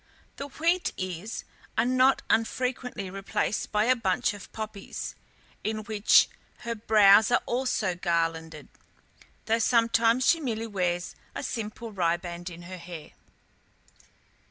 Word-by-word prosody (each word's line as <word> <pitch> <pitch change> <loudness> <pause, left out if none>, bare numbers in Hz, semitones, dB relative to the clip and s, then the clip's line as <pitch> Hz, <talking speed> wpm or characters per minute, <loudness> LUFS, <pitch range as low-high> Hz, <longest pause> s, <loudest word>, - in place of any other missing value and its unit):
The 280 - -5
wheat 340 +5 0
ears 185 +3 -4 0.3
are 225 - +3
not 255 +1 +3
unfrequently 240 -3 -1
replaced 195 +2 -2
by 210 0 +2
a 255 +3 +4
bunch 210 -2 0
of 205 - -11
poppies, 215 -2 -6 0.5
with 215 -1 -3
which 215 -1 +5 0.3
her 235 -1 -3
brows 215 -1 +6
are 245 - +2
also 240 -6 0
garlanded, 165 -3 -2 0.8
though 225 +1 +2
sometimes 230 +1 +3
she 330 - +5
merely 230 -6 -2
wears 180 -4 -2 0.2
a - - -4
simple 225 -2 -5
riband 175 -1 -2
in 175 0 -10
her 185 +1 -8
hair. 170 -3 -9
215 Hz, 125 wpm, -27 LUFS, 180-235 Hz, 0.8 s, brows